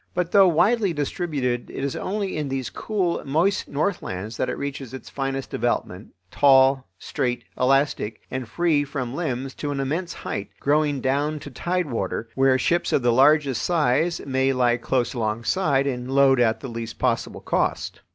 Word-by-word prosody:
But, 180 -1 -1
though 195 -2 +7
widely 190 +4 +3
distributed, 145 -5 -2
it - - -5
is 140 - -2
only 200 -1 -3
in 150 -2 -2
these 130 -2 -3
cool, 190 -6 -1
moist 165 +9 +1
northlands 115 - -3
that 130 - -1
it - - -3
reaches 135 -2 -5
its 130 - -10
finest 135 -1 -3
development, - - -2 0.2
tall, 135 -1 +4
straight, 125 -1 -2
elastic, 130 -4 +1
and 130 -3 -4
free 160 +1 +2
from 130 -3 -4
limbs 135 -4 -3
to 145 - -5
an 140 -1 -2
immense 160 +7 -2
height, 100 - -5
growing 145 -1 +1
down 145 +4 0
to 145 - -9
tide 175 +3 -2
water, 115 -1 -3
where 135 -1 +3
ships 170 +7 +1
of 130 - +2
the 120 -1 +3
largest 135 -1 +4
size 160 +2 +1
may 135 0 +1
lie 120 -2 +2
close 120 0 -1
alongside 130 - 0
and 125 -2 -3
load 135 -1 +4
at 115 -2 +2
the 135 - -5
least 115 -1 -6
possible 120 -3 -1
cost. - - -1
135 Hz, 170 wpm, -24 LUFS, 125-155 Hz, 0.2 s, though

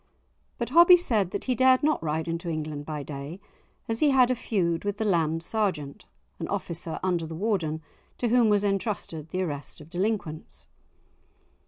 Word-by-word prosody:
But 235 - -3
Hobbie 345 +5 +8
said 220 - +1
that - - -4
he 255 - 0
dared 260 +2 +4
not 305 +1 +2
ride 160 +1 -2
into 170 +1 -3
England 155 -2 -4
by 150 -2 -4
day, 145 +5 -7 0.5
as 225 0 -1
he 300 - +4
had 255 -2 +5
a - - +2
feud 175 -8 -1
with 205 0 -2
the 220 - -1
Land 165 -4 +1
Sergeant 180 -10 -2 0.3
(an - - -3
officer 165 -1 -4
under 175 -3 0
the 160 - -7
Warden, 165 -5 -1 0.3
to 240 - 0
whom 235 -1 +4
was 205 -1 +3
entrusted 195 -6 -2
the 185 +2 -1
arrest 145 -5 -5
of 155 +1 -14
delinquents). 185 -4 -3
185 Hz, 175 wpm, -27 LUFS, 160-225 Hz, 0.5 s, Hobbie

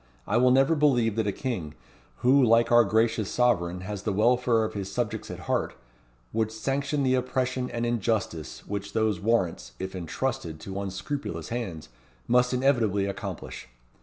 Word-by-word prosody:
"I - - -1
will 125 +1 +5
never 135 +4 +4
believe 125 -8 +2
that 110 -2 +1
a - - +2
king, 90 - -4 0.5
who, 135 +2 +5
like 115 0 +4
our 120 0 +7
gracious 110 0 +1
sovereign, 90 -8 +1
has 100 +1 -5
the 110 - -1
welfare 115 +2 +3
of 110 - -3
his 100 -2 -5
subjects 120 0 -3
at - - -7
heart, - - -1 0.6
would 110 -1 0
sanction 140 +5 -1
the 130 -1 +2
oppression 130 0 -1
and 120 0 -2
injustice 110 -8 -2
which 100 0 -5
those 110 -4 +1
warrants, 90 - 0
if 95 +5 -5
entrusted 85 -2 -3
to 95 +2 -5
unscrupulous 100 +9 -4
hands, 110 - -5 0.4
must 125 +1 +3
inevitably 120 -7 +2
accomplish. 100 - -6
115 Hz, 160 wpm, -27 LUFS, 100-125 Hz, 0.6 s, our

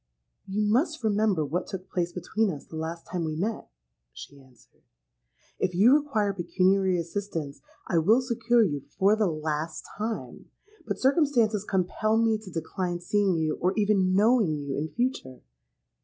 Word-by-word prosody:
'—'You 205 +2 -1
must 280 - +1
remember 205 -6 +1
what 170 +6 -3
took 190 -2 -7
place 175 -1 -1
between 195 +5 -1
us 150 -6 -6
the - - -11
last 165 +1 -5
time 180 -2 -3
we 155 -1 -3
met,' 210 +7 -3 0.4
she 135 - -12
answered. 130 -4 -24 0.8
'If 180 - -1
you 220 +8 +6
require 260 -9 +1
pecuniary 185 +1 +2
assistance, 165 -5 -4 0.3
I 170 - +2
will 215 +10 +4
succour 235 -2 +2
you 145 -8 -1 0.2
for 200 +3 +4
the 215 -2 +1
last 155 0 -3
time; 220 +1 -5 0.4
but - - -2
circumstances 260 - +2
compel 205 +3 0
me 225 -1 +2
to 215 -3 -11
decline 175 +1 -3
seeing 190 0 +1
you, 155 -1 -1
or 185 +2 +2
even 200 -3 +2
knowing 210 -6 +3
you 140 -2 -4
in 155 +2 -3
future.' 235 - -3
190 Hz, 155 wpm, -27 LUFS, 165-220 Hz, 0.8 s, you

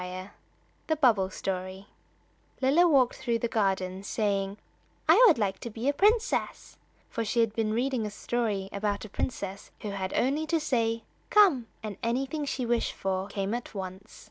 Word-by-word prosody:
X 185 +2 -7 0.6
THE 315 - +2
BUBBLE 225 -10 +3
STORY 185 0 -4 0.7
LILLA 290 +7 +4
walked 260 -5 +3
through 235 -3 0
the 235 - -1
garden, 190 -4 0
saying 200 -1 -1 0.5
"I - - +7
should 340 - +5
like 195 -3 -1
to 235 - -6
be 225 +4 -4
a 285 - +3
princess," 440 +8 +1 0.3
for 230 - -3
she 225 +2 -1
had 225 -2 +3
been 220 -1 0
reading 245 -1 0
a - - -4
story 210 -2 -2
about 205 +1 -2
a - - -10
princess 195 -3 -4
who 210 - -4
had 190 -1 -3
only 290 +5 +1
to 330 +1 +2
say 230 -6 0 0.3
"Come," 355 - +5 0.2
and 210 -3 -5
anything 270 +6 -1
she 260 -2 -2
wished 235 0 0
for 190 0 -2
came 200 0 -3
at 240 -2 -5
once. 190 +2 -7
225 Hz, 170 wpm, -28 LUFS, 195-260 Hz, 0.7 s, I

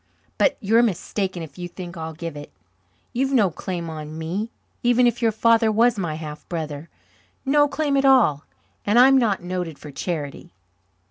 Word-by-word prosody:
"But - - +3
you're 225 +3 +3
mistaken 190 -4 -1
if 160 +3 -11
you 175 - -4
think 175 0 -9
I'll 160 -1 -6
give 165 -1 -6
it. 145 - -9 0.6
You've 265 +2 0
no 210 -8 +4
claim 175 0 -5
on 155 -1 -7
me, 180 +8 -3 0.3
even 245 +1 +4
if 240 0 +1
your 230 -1 +3
father 225 0 +3
was 230 +2 +3
my 165 -5 -2
half 155 -1 -8
brother 155 -2 -5 0.6
no 290 +2 +4
claim 285 0 -1
at 275 - +3
all. 250 - +4 0.4
And 205 +3 +2
I'm 265 +2 +7
not 210 -7 0
noted 180 -4 -4
for 150 - -10
charity." 155 +1 -5
185 Hz, 175 wpm, -23 LUFS, 160-240 Hz, 0.6 s, I'm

